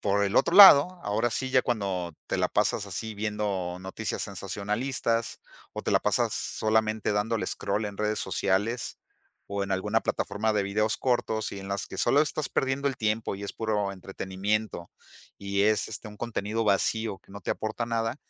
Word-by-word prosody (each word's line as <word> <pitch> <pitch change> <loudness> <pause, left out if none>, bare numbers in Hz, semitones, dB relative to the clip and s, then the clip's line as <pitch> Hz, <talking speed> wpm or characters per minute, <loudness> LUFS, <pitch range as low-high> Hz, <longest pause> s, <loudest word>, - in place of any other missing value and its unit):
por 100 0 +1
el 100 - -2
otro 175 - +3
lado, 180 -2 +9
ahora 110 +3 0
sí 130 +3 -2
ya 130 - +5
cuando 95 -7 -2
te - - -1
la - - +1
pasas - - 0
así 110 -1 -5
viendo 100 -4 -2
noticias 95 +3 -4
sensacionalistas, 105 +5 -2 0.3
o - - -5
te - - -1
la - - +4
pasas - - +1
solamente 110 -1 0
dándole 110 +2 0
scroll 105 +2 -2
en 100 -1 -5
redes 105 0 -1
sociales 100 +5 -1 0.5
o 100 0 -3
en 100 - -4
alguna 105 +4 +1
plataforma 110 +2 -1
de 105 -2 +1
videos 105 +3 0
cortos 110 -4 -1
y 100 - -6
en 95 - -8
las 100 0 -2
que - - -9
solo 145 - +4
estás 150 -1 -1
perdiendo 135 +1 0
el 130 - -4
tiempo 110 -2 -1
y 100 - -7
es - - -5
puro 105 -3 -1
entretenimiento, 95 0 -3 0.5
y 100 0 -1
es 110 +1 +2
este 110 0 -7
un 105 - -12
contenido 115 -1 -2
vacío 105 0 +1
que - - -23
no 100 +1 -9
te - - -1
aporta 110 +2 -4
nada, 115 +2 -1
105 Hz, 185 wpm, -27 LUFS, 100-115 Hz, 0.5 s, lado